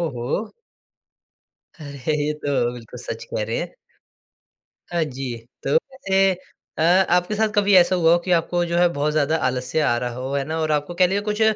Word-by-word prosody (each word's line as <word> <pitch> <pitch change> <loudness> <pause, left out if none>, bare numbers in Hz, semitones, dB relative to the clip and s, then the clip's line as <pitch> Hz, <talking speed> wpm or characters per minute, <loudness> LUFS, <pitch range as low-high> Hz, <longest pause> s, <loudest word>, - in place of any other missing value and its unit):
हो! 140 - -3 1.2
अरे 145 -1 -4
ये 150 - 0
तो, 140 -5 -1
बिल्कुल 115 -2 -10
सच - - -6
कह - - 0
रहे - - -2
हैं। - - -5 1.2
हाँ 170 -2 +2
जी, 130 -4 -5 0.3
तो 475 - +4 0.4
ए 195 0 +5 0.4
अ, - - -2
आपके 180 +3 +3
साथ 220 0 +1
कभी 205 0 +3
ऐसा 180 0 +6
हुआ 165 -2 +4
हो 175 - +5
कि 180 - -1
आपको 175 +1 +2
जो 170 0 -1
है 175 0 +5
बहुत 145 +1 0
ज़्यादा 155 +1 +1
आलस्य 130 +3 -1
आ 120 - +2
रहा 120 0 -3
हो 130 +2 -5
है 140 -1 0
ना? 160 +2 -3
और 155 -1 0
आपको 150 +3 -1
कह 180 +1 +4
लिए 195 +2 0
कुछ 210 +1 -3
160 Hz, 190 wpm, -22 LUFS, 140-180 Hz, 1.2 s, ऐसा